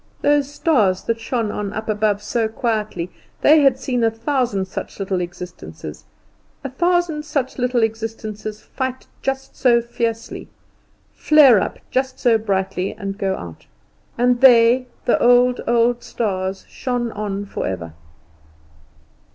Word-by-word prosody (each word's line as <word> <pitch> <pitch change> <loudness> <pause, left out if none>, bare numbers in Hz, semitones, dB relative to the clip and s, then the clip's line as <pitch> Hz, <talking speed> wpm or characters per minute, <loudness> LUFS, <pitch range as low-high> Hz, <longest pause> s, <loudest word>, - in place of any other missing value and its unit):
Those 290 -1 +2
stars 220 - +2
that 230 0 -1
shone 225 -2 -2
on 205 -1 -4
up 220 0 -5
above 210 -1 0
so 225 +1 0
quietly, 215 -6 -2 0.3
they 305 +1 +6
had 270 -2 +4
seen 255 -2 -1
a 225 - +4
thousand 225 -3 -1
such 190 - -7
little 190 -2 -1
existences 175 +1 -8 2.7
fight 260 0 -3
just 270 0 -3
so 240 -2 +4
fiercely, 230 -1 -4 0.6
flare 285 -8 +6
up - - -3
just 260 0 -1
so 235 -3 +3
brightly 195 -2 -2
and 200 -1 -6
go 190 -1 0
out; 85 -2 -10 0.5
and 245 +1 +2
they, 245 0 +6 0.2
the - - +2
old, 245 +1 +4
old 235 0 +2
stars, 190 -3 -3
shone 245 -2 -3
on 205 -1 -4
forever. 85 - -4
230 Hz, 120 wpm, -20 LUFS, 200-250 Hz, 2.7 s, they